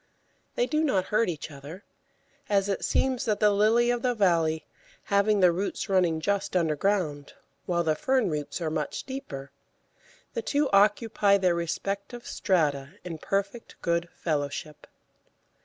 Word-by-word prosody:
They - - +2
do 310 -7 0
not 195 -12 +1
hurt 215 -1 +3
each 160 -2 -5
other, 145 +8 -10 0.7
as 200 -1 +2
it 195 - -2
seems 260 -2 +1
that 210 -2 0
the 210 -1 +5
Lily 225 +4 +3
of 240 -1 -1
the 245 -1 0
Valley, 165 -6 +2 0.5
having 200 0 +3
the 180 -1 +6
roots 195 +4 -3
running 180 -4 +2
just 200 +3 -1
underground, 160 -3 0 0.3
while 170 -1 +1
the 160 -2 +2
fern 260 +8 +1
roots 150 +1 -3
are 160 -2 -1
much - - -3
deeper, 140 - -7 0.8
the 470 - -2
two 290 -9 0
occupy 205 0 +4
their 185 -3 +2
respective 195 +7 -4
strata 145 -7 0
in 170 -3 -6
perfect 200 +6 -3
good 170 0 0
fellowship. 150 -1 -3
190 Hz, 145 wpm, -27 LUFS, 160-215 Hz, 0.8 s, the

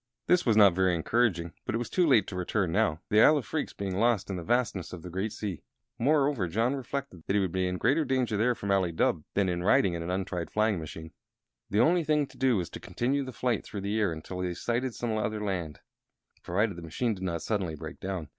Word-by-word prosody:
This 180 -5 +3
was 110 -2 +4
not 100 -4 +7
very 95 0 +2
encouraging, 85 -2 0
but - - -2
it - - +2
was 120 - -3
too 180 -2 +2
late 115 -9 +5
to 95 - -7
return 90 0 -1
now, 85 -5 +1
the 105 +1 +5
Isle 155 - +7
of 135 - -3
Phreex 155 -2 -2
being 95 -2 -3
lost 105 -4 +2
in - - -2
the 90 - -4
vastness 110 -3 -1
of 85 -3 -8
the 90 - -8
great 95 +4 -2
sea. 100 -7 -5 0.4
Moreover, 140 - +2
John 115 +9 +1
reflected 135 -7 -5
that 100 - +1
he - - +4
would 95 -3 0
be 95 0 0
in 90 0 -2
greater 135 - +2
danger 130 -5 0
there 120 +4 +2
from 100 -2 -3
Ali 95 -3 +2
Dubh 80 -1 +1
than 100 -1 +2
in 90 -1 -1
riding 95 0 +3
in 85 - -3
an 85 - -4
untried 90 -2 -2
flying 105 -3 +1
machine. 80 0 -8 0.6
The 105 +3 +3
only 175 +1 +4
thing 150 -1 +2
to - - -18
do 130 -4 +3
was 90 -3 -3
to - - -7
continue 140 +4 -1
the 130 - -6
flight 120 -2 -1
through 100 - -6
the 100 +3 -1
air 105 -5 +2
until 80 +3 -6
they 90 -1 -2
sighted 120 +5 -2
some 115 -2 -2
other 110 0 -1
land 85 -7 -3 0.6
provided 100 +2 0
the - - -7
machine 110 +9 -1
did 95 - -9
not 85 -3 -2
suddenly 95 -7 -1
break 75 - -8
down. 95 -5 -4
100 Hz, 245 wpm, -29 LUFS, 90-120 Hz, 0.6 s, not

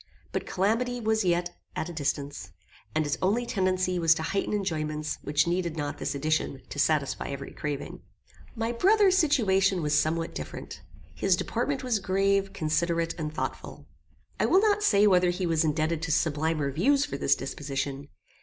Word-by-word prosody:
But - - -3
calamity 230 +6 0
was 220 -1 +1
yet 175 -1 0 0.2
at 160 - -2
a 175 - -7
distance, 145 -2 -3 0.4
and 155 0 +2
its 145 +2 -2
only 215 +6 +1
tendency 185 -3 0
was 165 -1 +5
to 160 - -4
heighten 195 +4 -1
enjoyments 155 -6 -2
which 150 +1 +1
needed 170 -1 -1
not 145 -1 -3
this - - -2
addition 155 -1 -1
to 145 - -6
satisfy 145 -2 +1
every 140 0 -6
craving. 145 -2 -5 0.5
My 225 0 -1
brother's 385 - +4
situation 195 - +3
was 150 0 0
somewhat 165 +2 0
different. - - -7 0.3
His - - +2
deportment - - -2
was 240 -4 +1
grave, 195 +1 +1
considerate, 165 +1 0
and 155 -1 -3
thoughtful. 155 - -5 0.5
I - - +2
will 380 - +5
not 420 -1 +2
say 205 - +4
whether 180 -3 +4
he 180 +1 -1
was 165 -1 +2
indebted 155 +1 0
to 165 0 -2
sublimer 155 -2 0
views 275 - +2
for 295 - -5
this 140 - +3
disposition. 140 0 -4
170 Hz, 165 wpm, -27 LUFS, 155-200 Hz, 0.5 s, was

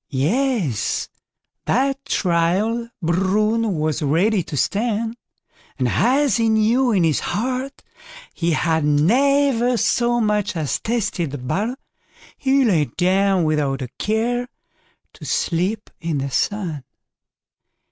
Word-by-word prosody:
Yes, 170 - 0 0.6
that 275 +2 0
trial 190 +7 0
Bruin 205 +5 +1
was 155 0 -1
ready 180 +8 +2
to 155 -3 -6
stand; 225 - -1 0.6
and 130 -2 0
as 260 - +2
he 225 -1 +2
knew 225 +4 +3
in 190 -5 +2
his 160 -3 +2
heart 255 +4 -3 0.5
he 170 -1 0
had 160 -1 +1
never 245 - +3
so 240 +1 +1
much 210 -3 0
as 155 -4 -1
tasted 215 -8 -2
the 145 - -5
butter, 205 - -2 0.6
he 270 0 +2
lay 170 -9 +3
down 190 +2 +1
without 145 -4 0
a 125 - -6
care 240 +3 0 0.7
to - - -15
sleep 185 +6 -1
in 165 -3 -2
the 140 0 -3
sun. 165 -1 -2
205 Hz, 115 wpm, -21 LUFS, 165-235 Hz, 0.7 s, knew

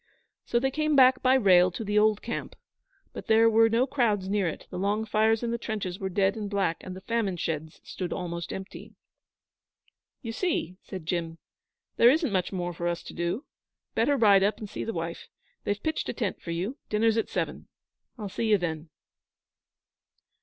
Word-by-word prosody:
So 235 - +2
they 270 +2 0
came 305 +1 +1
back 255 -1 +6
by 260 0 +4
rail 185 -7 +5
to 180 +5 -6
the 210 0 +2
old 215 -1 +2
camp; 235 - -5 0.6
but - - -8
there 225 +1 +5
were 225 0 +5
no 230 +3 +3
crowds 230 -8 0
near 200 -2 +1
it, 160 - -5
the - - -4
long 205 +3 0
fires 220 +1 +2
in 235 - -1
the 235 - -2
trenches 200 -6 -4
were 190 - -3
dead 195 +2 +1
and 210 -2 -4
black, 195 -5 0
and 185 - -7
the 190 - -9
famine 205 -3 -1
sheds 160 -1 -4
stood 180 -2 -5
almost 170 -1 -4
empty. 190 0 -8 1.3
'You 230 - -4
see!' 225 - -2
said 185 -4 -8
Jim. 165 -1 -2 0.6
'There 235 - +7
isn't 305 -1 +2
much 185 -2 0
more 175 -2 -3
for 170 +1 -3
us 170 0 -2
to - - -9
do. 175 - -2 0.5
Better 280 +5 +2
ride 205 -5 +6
up 205 +2 +2
and 215 - -7
see - - -5
the 225 - -3
wife. 165 -3 -5 0.4
They've 205 0 -2
pitched 315 0 -2
a - - -1
tent 215 -6 -3
for - - -9
you. 185 - -3
Dinner's 220 +1 +2
at - - -2
seven. - - -3 0.5
I'll 210 -3 -5
see 220 +3 -2
you 210 - +6
then.' 160 -3 -4
205 Hz, 195 wpm, -27 LUFS, 180-230 Hz, 1.3 s, There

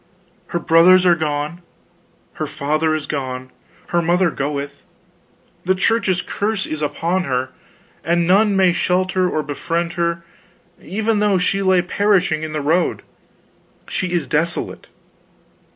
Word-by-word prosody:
Her - - -2
brothers 170 +3 +5
are 175 - +6
gone, 155 +1 -3 0.7
her - - -4
father 155 +2 0
is 155 - -4
gone, 130 -3 -5 0.4
her 175 - +1
mother 175 +1 +2
goeth, 140 0 -4 0.8
the 190 +1 +1
Church's 190 -2 +1
curse 205 -1 -2
is 155 -1 -5
upon 170 +5 -1
her, 130 0 -2 0.5
and 170 +1 +1
none 200 +3 +4
may 185 -2 +4
shelter 185 +1 +1
or 155 - -1
befriend 165 +4 -3
her 170 0 -2 0.6
even 220 +2 -1
though 205 -2 +2
she 195 +2 0
lay 190 -2 +3
perishing 185 -4 +1
in 155 0 -5
the 155 -1 -2
road. 160 +5 0 0.8
She 185 -3 -3
is 175 -4 0
desolate. 165 +4 -2
170 Hz, 135 wpm, -19 LUFS, 155-185 Hz, 0.8 s, are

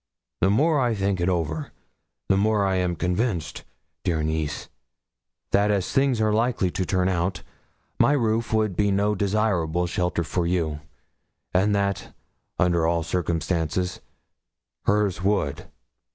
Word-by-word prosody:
The 95 - +3
more 150 +9 +3
I 120 -3 +1
think 100 -2 0
it 85 - +2
over, 80 -4 -2 0.6
the 95 - +3
more 105 0 +2
am 90 -2 +1
I - - -6
convinced, 90 +2 -2 0.4
dear 80 -3 0
niece, 80 -1 -2 0.8
that 100 +1 +3
as 100 -3 0
things 135 -3 +2
are 110 -1 +2
likely 115 -5 +1
to 95 - -2
turn 95 -1 +1
out, 90 0 -1 0.6
my 145 - +5
roof 115 -4 0
would 110 -4 +1
be 100 +1 +2
no 100 +2 +2
desirable 95 -5 0
shelter 90 0 -1
for 85 +1 -1
you; 80 -4 -1 0.7
and 100 +3 +3
that, 100 -1 -2 0.4
under 85 -2 +2
all 85 0 +1
circumstances, 85 +1 -1 0.8
hers 105 -3 +1
would. 95 -8 -1
95 Hz, 135 wpm, -24 LUFS, 85-105 Hz, 0.8 s, my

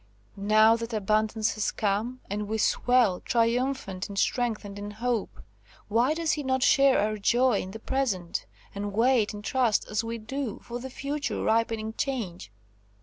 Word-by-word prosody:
Now 215 +3 +5
that 230 0 -6
abundance 215 +1 +1
has 215 - -1
come, 220 +5 -1
and 205 +1 -3
we 220 +1 -1
swell, 240 -4 +3
triumphant 230 -4 0
in 200 - -7
strength 230 +1 0
and 200 0 -8
in 205 0 -5
hope, 240 -2 -2 0.5
why 240 +8 +2
does 330 -1 0
he 300 - -1
not 260 -2 0
share 275 0 +5
our 215 +1 0
joy 240 +1 +3
in 185 - -7
the 205 - -7
present, 220 -8 -2 0.3
and 200 0 -4
wait, 230 0 +3
in 210 0 -8
trust, 245 -2 +1
as 215 +1 0
we 230 +1 -4
do, 230 +1 -4
for 240 0 -6
the 260 +2 -7
future 280 +3 -3
ripening 225 -1 0
change? 215 - -4
225 Hz, 165 wpm, -27 LUFS, 210-255 Hz, 0.5 s, Now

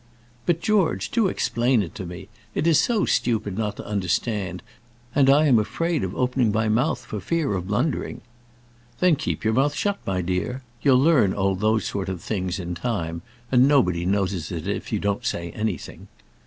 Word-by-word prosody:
"But, 170 -1 +2
George, 210 -4 +1
do 225 -4 +3
explain 120 - +1
it 85 - -8
to 95 -4 -6
me. 90 +2 -8 0.3
It - - 0
is 165 -3 +5
so 225 -4 +2
stupid 105 -5 0
not 105 -1 -2
to - - -7
understand, 95 -1 -2 0.5
and 135 -1 +4
I 145 +3 +6
am 125 -6 +5
afraid 165 - -1
of 95 0 -3
opening 125 -3 +1
my 110 +1 +1
mouth 125 +9 +1
for 105 - -5
fear 150 - -1
of 90 -2 -3
blundering." 105 +10 -1 0.8
"Then 180 -3 +4
keep - - -3
your 110 0 +2
mouth 140 +5 +2
shut, 200 -1 -1
my 95 -2 0
dear. 95 +9 -2 0.2
You'll 135 -3 +5
learn 140 - +4
all 95 -1 +1
those 110 +3 +1
sort 95 -1 -3
of 95 -2 -4
things 95 -1 -3
in 90 -1 -4
time, 85 -5 -3 0.3
and 125 0 +5
nobody 90 -12 +3
notices 95 -2 -1
it 85 -3 -5
if - - -3
you - - +1
don't 100 0 -1
say 85 0 -3
anything." 105 -5 -4
110 Hz, 185 wpm, -24 LUFS, 95-135 Hz, 0.8 s, I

